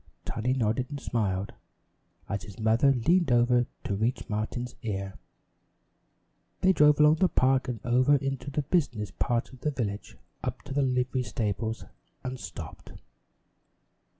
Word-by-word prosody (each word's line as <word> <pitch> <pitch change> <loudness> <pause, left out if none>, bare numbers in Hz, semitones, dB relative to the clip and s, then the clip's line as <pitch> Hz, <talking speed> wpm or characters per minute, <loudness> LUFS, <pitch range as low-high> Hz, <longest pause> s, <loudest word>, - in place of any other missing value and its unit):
Tiny 120 +3 -1
nodded 125 0 0
and 145 -1 -5
smiled, 100 -6 -1 0.7
as 100 - -2
his 100 -3 -11
mother 115 +5 +4
leaned 165 +6 +2
over 120 0 +4 0.2
to 100 - -2
reach 115 +4 -1
Martin's 115 +4 -3
ear. 100 -3 -3 1.5
They 190 0 +5
drove 150 -2 +5
along 150 +1 +6
the 185 +1 +3
park 130 -1 +2
and 120 -3 -3
over 125 +4 +4
into 135 0 -2
the 145 +2 -1
business 125 - 0
part 120 +5 -1
of 130 - -13
the 150 - 0
village, 110 -8 -4 0.3
up - - -4
to 135 - -7
the 145 - +2
livery 125 -1 +1
stables 110 -1 -2 0.4
and 130 0 -4
stopped. 90 -3 -9
125 Hz, 145 wpm, -28 LUFS, 110-135 Hz, 1.5 s, along